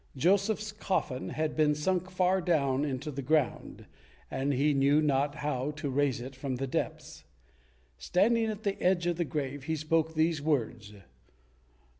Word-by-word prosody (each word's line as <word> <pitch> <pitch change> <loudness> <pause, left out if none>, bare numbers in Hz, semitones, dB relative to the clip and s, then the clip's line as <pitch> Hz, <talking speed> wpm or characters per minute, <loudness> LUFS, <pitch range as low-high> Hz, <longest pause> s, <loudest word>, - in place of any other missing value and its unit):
Joseph's 200 +7 +2
coffin 190 -11 -2
had 155 +3 -2
been 150 -1 +3
sunk 180 +4 -1
far 185 0 +2
down 140 -6 +1
into 145 +1 -3
the 140 0 -5
ground, 145 0 -1 0.5
and 135 +2 -1
he 145 +3 +2
knew 140 +2 +4
not 145 -1 +1
how 145 -3 -2
to 150 -3 -3
raise 140 -2 +1
it 130 +2 -8
from 130 0 -3
the 135 +2 -2
depths. 130 - -4 0.8
Standing 225 +5 +2
at 215 0 -4
the 200 -1 -2
edge 180 -1 +2
of 175 -1 0
the 175 - +1
grave, 145 -3 -4
he 160 0 -1
spoke 160 +1 0
these 160 -1 +1
words. 120 -8 -1
150 Hz, 160 wpm, -30 LUFS, 135-175 Hz, 0.8 s, knew